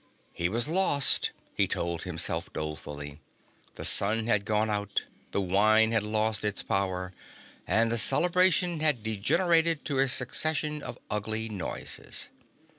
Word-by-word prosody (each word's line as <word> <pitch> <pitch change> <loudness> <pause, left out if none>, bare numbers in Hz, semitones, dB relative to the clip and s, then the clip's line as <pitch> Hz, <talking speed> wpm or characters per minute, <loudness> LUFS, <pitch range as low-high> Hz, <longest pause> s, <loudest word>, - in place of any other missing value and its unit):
He 85 0 -2
was 115 +6 +1
lost, 160 -5 +4 0.2
he - - +1
told 85 -1 -3
himself 85 -2 -3
dolefully. 75 -1 -7 0.6
The - - -1
sun 110 +3 +4
had 105 -3 +1
gone 110 0 0
out, 105 -2 -2 0.3
the - - -2
wine 110 +4 +3
had 110 -1 +1
lost 110 0 -1
its 105 -1 -2
power 95 -2 -2 0.5
and 115 +1 +2
the 115 - 0
celebration 180 - +3
had 150 -8 +1
degenerated 165 - +1
to 140 -3 -2
a 135 0 +3
succession 150 +4 +1
of - - -7
ugly 110 +2 -3
noises. 95 -5 -3
110 Hz, 135 wpm, -27 LUFS, 100-145 Hz, 0.6 s, lost